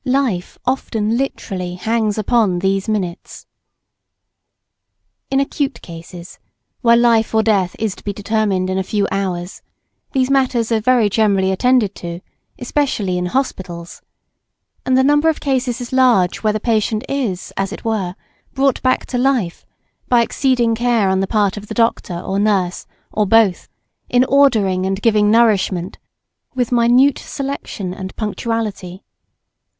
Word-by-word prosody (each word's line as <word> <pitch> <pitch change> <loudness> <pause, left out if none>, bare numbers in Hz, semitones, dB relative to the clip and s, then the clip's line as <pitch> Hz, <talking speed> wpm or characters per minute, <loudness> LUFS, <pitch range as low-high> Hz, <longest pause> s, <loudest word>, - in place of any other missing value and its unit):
Life 255 -9 -1
often 230 -4 -1
literally 195 -9 -3
hangs 220 +2 -1
upon 215 -4 +2
these 195 +3 0
minutes. 190 -5 -4 1.8
In 270 - +1
acute 275 0 -2
cases, 170 +1 -11 0.4
where 235 -1 +5
life 230 -2 +3
or 220 - +4
death 195 -5 +1
is 220 -3 -1
to - - -16
be 205 - -2
determined 200 -2 -1
in 190 - 0
a - - -1
few 200 +1 -1
hours, 185 -2 -3 0.5
these 260 -1 +1
matters 255 -4 +1
are 225 - +3
very 235 0 +3
generally 200 -2 +2
attended 230 0 +2
to, 170 0 -6 0.4
especially 245 -8 -1
in 180 - -2
Hospitals; 180 -8 -4 0.9
and 260 0 +3
the 260 - +4
number 295 +3 +3
of 320 - -1
cases 255 -3 -1
is 245 0 -7
large 245 -9 +3
where 215 -1 0
the 215 - -1
patient 220 -1 0
is, 240 -10 -3
as 195 0 -2
it - - -9
were, 200 -5 -2 0.4
brought 275 -1 +1
back 255 0 +1
to 250 - -3
life 250 -10 0 0.4
by 240 -2 +5
exceeding 245 -2 +1
care 230 -3 +1
on 190 0 +1
the 195 - 0
part 205 -2 +1
of 205 0 -8
the - - -6
Doctor 230 -6 0
or 195 +2 -2
Nurse, 195 -4 0 0.2
or 210 -1 0
both, 220 -3 +3 0.4
in 245 0 +4
ordering 220 -10 +3
and 195 0 -2
giving 210 -1 +3
nourishment 205 -5 +2 0.6
with 250 -2 -1
minute 245 +3 +4
selection 270 -9 -5
and 190 0 -8
punctuality. 210 -4 -4
220 Hz, 145 wpm, -18 LUFS, 190-245 Hz, 1.8 s, where